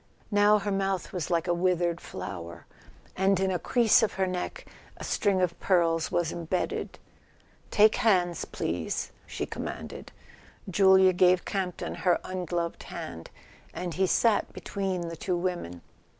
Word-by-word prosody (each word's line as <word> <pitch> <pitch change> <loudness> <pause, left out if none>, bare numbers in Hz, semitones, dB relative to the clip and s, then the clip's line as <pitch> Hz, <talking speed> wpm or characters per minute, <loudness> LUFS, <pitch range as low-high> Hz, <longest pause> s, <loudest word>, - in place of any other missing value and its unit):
Now 205 +1 +5
her 205 0 -3
mouth 195 -1 -1
was 180 -5 -3
like 170 -1 0
a 175 - +2
withered 175 -1 +1
flower, 85 -2 -7 0.5
and 190 0 +2
in 190 0 +1
a 180 - -1
crease 240 -2 +4
of 220 - +1
her 190 - 0
neck 185 -1 -4 0.3
a - - -8
string 200 -3 +1
of 170 -2 -1
pearls 165 -3 +2
was 170 -2 0
embedded. 170 +2 -3 0.7
"Take 215 +1 +5
hands, 185 -8 +2
please," 80 -1 -3 0.2
she - - -4
commanded. - - -7 0.6
Julia 190 0 +5
gave 180 0 +4
Campton 185 -3 -3
her 180 -2 +3
ungloved 175 -2 -3
hand, 80 -1 -8 0.5
and 175 -2 -4
he 190 +2 +1
sat 225 +3 +2
between 190 -2 -3
the 165 -1 -5
two 180 +2 -2
women. 175 - -4
180 Hz, 145 wpm, -28 LUFS, 170-195 Hz, 0.7 s, Now